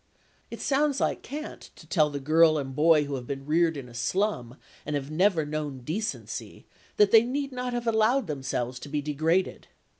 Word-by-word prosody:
It - - -8
sounds 285 0 +1
like - - 0
cant 300 +3 -8
to - - -15
tell 155 -4 +2
the 145 -1 -5
girl 155 +3 +4
and 135 -2 -4
boy 155 0 +5
who 145 -1 -5
have 125 -3 -5
been 135 -1 -5
reared 160 +1 +2
in 135 -3 -7
a 120 - -14
slum 125 - -1 0.3
and 150 - -3
have 140 +1 -4
never 170 -1 +2
known 150 -3 -4
decency 185 - -5 0.3
that 210 -1 +5
they 225 - +8
need 275 +4 -3
not 250 -1 -4
have 240 -1 -3
allowed 230 +3 +2
themselves 130 -4 -3
to 145 - -9
be 145 0 -2
degraded. 160 +5 0
155 Hz, 190 wpm, -27 LUFS, 140-215 Hz, 0.3 s, they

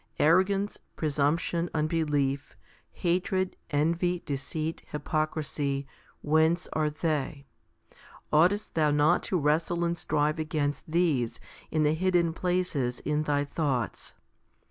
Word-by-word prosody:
Arrogance, 190 +5 +3 0.2
presumption, 160 +3 0
unbelief, 150 -3 0 0.3
hatred, 185 +1 0
envy, 170 +4 +1
deceit, 155 +3 -3
hypocrisy, 150 -2 -2 0.4
whence 160 +3 +3
are 155 -1 +1
they? 150 -2 -2 0.9
Oughtest 180 +7 +3
thou 155 -2 +3
not 150 +4 +3
to 185 - -1
wrestle 165 +3 +1
and 170 0 0
strive 155 -1 0
against 150 -2 -1
these 155 -8 +1 0.3
in 155 -1 +1
the 150 0 +3
hidden 175 -1 +2
places 175 -9 -1
in 150 0 0
thy 145 -2 +1
thoughts 140 - -2
155 Hz, 105 wpm, -28 LUFS, 145-170 Hz, 0.9 s, Arrogance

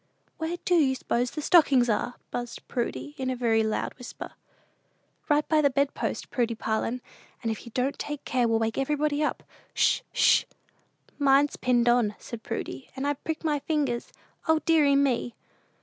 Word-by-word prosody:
"Where 330 +2 -2
do 360 - +2
you 285 -6 +4
s'pose 245 0 -1
the 305 - -6
stockings 280 -8 +5
are?" 230 +2 0 0.2
buzzed 240 -1 -5
Prudy, 250 +4 -3
in 260 -1 -1
a 255 - -1
very 230 -2 +2
loud 220 0 -1
whisper. 250 - -8 1.0
"Right 295 0 +3
by 310 -1 +3
the 285 - +4
bed 280 +1 +1
post, - - -4
Prudy 235 -2 0
Parlin; 225 +3 -2 0.4
and 225 - 0
if 220 - -7
you - - -9
don't 260 +2 0
take 295 -1 -5
care 250 -2 +1
we'll 225 0 +2
wake 225 +2 -1
everybody 295 +1 0
up. - - -2 0.3
'Sh! - - +3
'Sh!" - - +4 0.7
"Mine's 280 0 +4
pinned 245 -1 +2
on," 240 -4 +3
said 235 -2 -8
Prudy; 225 - -5
"and 265 +1 -3
I've 285 -1 -2
pricked 320 0 -3
my 300 -2 +1
fingers. 280 -6 -1 0.4
O 320 0 +5
deary 300 -4 +4
me!" 265 -4 +1
265 Hz, 175 wpm, -27 LUFS, 235-295 Hz, 1.0 s, stockings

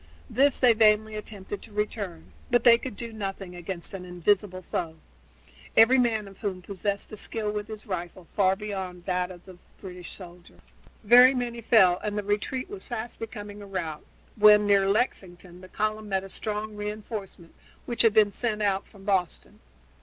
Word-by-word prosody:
This 275 +2 +3
they 245 -2 +6
vainly 215 0 +4
attempted 205 -1 -7
to 225 - -14
return, 205 -4 -4 0.2
but 240 -1 +3
they 235 -1 +7
could 255 -4 -6
do 230 0 -7
nothing 195 -3 -5
against 175 +1 -5
an 190 -2 -6
invisible 185 +1 0
foe, 165 -2 -2 0.8
every 250 +4 +7
man 225 -4 +1
of 195 -1 -14
whom 190 -4 -4
possessed 200 +1 -3
a - - -6
skill 215 0 -3
with 210 0 -4
his 215 0 -9
rifle 180 -3 -5
far 190 -2 +3
beyond 190 -4 -6
that 180 -1 -1
of 180 -1 -12
the 185 -2 -13 0.2
British 180 -2 -9
soldier. 175 -2 -12 0.5
Very 250 +4 +8
many 240 -2 -3
fell 190 -6 +5
and 210 0 -3
the 210 - -1
retreat 210 - -2
was 395 0 -8
fast 235 -1 -5
becoming 210 -2 -7
a 200 - -10
rout, 165 -6 -4 0.3
when, 210 0 +7
near 200 -1 +4
Lexington, 180 -5 -2
the 185 - -13
column 215 +1 -2
met 190 -1 0
a 195 - -9
strong 215 +1 -4
re 210 0 -3
enforcement 210 -5 -8 0.3
which 240 - -1
had 225 -2 +4
been 210 -2 +5
sent 215 -1 -2
out 195 -1 0
from 200 -3 -17
Boston. 190 -4 -1
205 Hz, 180 wpm, -27 LUFS, 185-220 Hz, 0.8 s, Very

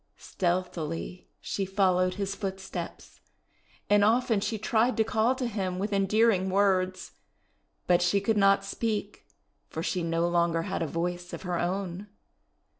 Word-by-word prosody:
Stealthily 175 -1 -3
she 200 - -3
followed 185 -1 +2
his 200 0 -2
footsteps, 190 -1 -6 0.7
and 205 0 +4
often 230 0 +3
she 220 +2 -2
tried 220 +2 +1
to 220 - +4
call 225 +3 +1
to 255 -1 -3
him 195 -5 -2
with 205 +2 -2
endearing 195 0 +3
words; 185 -1 +1 0.7
but 180 -1 +3
she 175 +3 +3
could 220 +3 0
not 195 -1 +4
speak, 210 0 -3 0.4
for 160 - -4
she 180 - -1
no 165 0 0
longer 170 -1 +1
had - - -3
a 165 - 0
voice 175 +3 -3
of - - -6
her 180 -2 -2
own. 185 +2 -3
190 Hz, 145 wpm, -28 LUFS, 180-205 Hz, 0.7 s, and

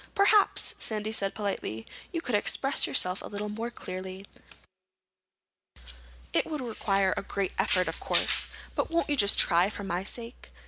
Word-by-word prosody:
"Perhaps," 405 0 +3
Sandy 215 -1 -2
said 195 -3 0
politely, 195 - -4 0.3
"you 335 - -3
could 250 - -5
express 270 +6 +3
yourself 180 +1 +2
a - - -8
little 210 +1 -5
more 225 +3 -4
clearly. 185 -3 -8 2.1
It - - +1
would 310 -2 -4
require 200 -6 0
a - - -2
great 195 -1 -3
effort, 185 -2 +2
of 165 - -4
course, - - +3 0.2
but - - -2
won't 335 -2 0
you - - +2
just 200 -6 +4
try 175 +2 +4
for 205 - -7
my 180 -1 -3
sake?" 235 +4 -9
205 Hz, 155 wpm, -28 LUFS, 190-240 Hz, 2.1 s, just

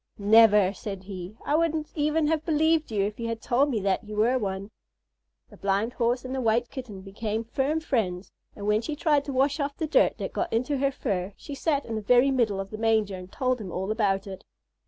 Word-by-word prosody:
"Never!" 210 -2 +6
said 195 -1 -7
he; 190 +1 -8
"I - - 0
wouldn't 320 -1 0
even 305 +1 +1
have 310 0 +1
believed 315 -2 +2
you 200 -2 +1
if 210 +2 -5
you 230 - -3
had 230 -1 -3
told 260 +6 +2
me 235 -6 0
that 195 +2 0
you 210 0 -8
were 235 +5 +2
one." 195 -1 -4 0.8
The - - -14
Blind 200 +4 0
Horse 245 +1 0
and 255 - -5
the 265 - -2
White 235 +1 +1
Kitten 245 -8 -7
became 210 +3 -4
firm 270 +7 -1
friends, 205 - -2 0.2
and 200 - -7
when 210 +1 +2
she 300 +5 -4
tried 295 -2 +2
to 280 - -4
wash 275 +3 +1
off 285 0 -2
the 320 - -1
dirt 310 - +3
that - - -5
got - - -2
into 255 +5 0
her 275 0 +2
fur 200 -7 -3
she 290 - -9
sat 285 0 0
in 230 - -5
the 215 - -2
very 245 +5 +4
middle 225 -7 +1
of 195 0 -5
the 215 - -6
manger 220 -3 +2
and 185 0 -10
told 255 -3 -1
him 190 -4 -6
all 190 +4 -3
about 200 -3 +1
it. 190 -1 -8
230 Hz, 230 wpm, -26 LUFS, 200-275 Hz, 0.8 s, Never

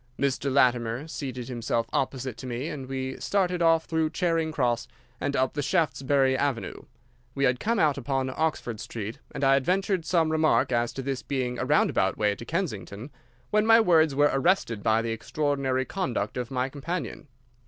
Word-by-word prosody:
Mr. 140 0 0
Latimer 125 0 +2
seated 130 -6 -5
himself 115 -2 -1
opposite 130 -2 -1
to 130 - -8
me 125 +5 -3
and 135 -3 -7
we 130 0 -3
started 180 -3 0
off 165 -1 +4
through 160 -1 0
Charing 165 -1 0
Cross 120 -6 0 0.3
and 140 - -2
up 130 -1 +1
the 145 - -2
Shaftesbury 140 -5 +2
Avenue. 140 -3 -2 0.5
We 140 - -1
had 125 -2 +2
come 230 +2 0
out 150 -7 +2
upon 130 0 -1
Oxford 150 -8 -1
Street 110 0 -6
and - - -5
I 135 0 +5
had 135 -1 +3
ventured 190 +1 0
some 160 -1 +1
remark 155 -4 +2
as 120 -1 +1
to 135 - -5
this 135 -1 -3
being 125 -3 -2
a - - -1
roundabout - - +2
way 105 -1 +2
to 115 - -9
Kensington, 120 - -4 0.4
when 215 +1 +3
my 225 0 +8
words 160 -8 +4
were 145 +1 +4
arrested 135 - +1
by 110 +1 +2
the 115 - -2
extraordinary 130 +2 -1
conduct 125 - -2
of 125 -1 -3
my 130 -1 -1
companion. 150 +1 -5
135 Hz, 180 wpm, -27 LUFS, 125-160 Hz, 0.5 s, my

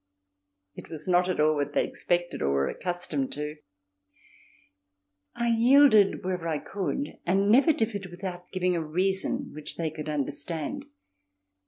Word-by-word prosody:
It - - -11
was 155 0 -7
not 180 0 +3
at 185 - -1
all 155 +1 +4
what 145 -1 -2
they - - +2
expected 175 0 -2
or 70 - +1
were 70 0 +1
accustomed 175 -7 -3
to. 150 +1 -5 1.8
I 235 0 0
yielded 230 -3 +5
wherever 180 -2 -2
I 160 -2 0
could 205 - -4
and 195 +3 +2
never 275 +8 +6
differed 215 -8 -2
without 180 0 -7
giving 180 -1 0
a 170 - 0
reason 190 - -1
which 150 0 -7
they 160 -2 -2
could 155 0 -6
understand. 145 +2 -3
175 Hz, 145 wpm, -27 LUFS, 155-195 Hz, 1.8 s, never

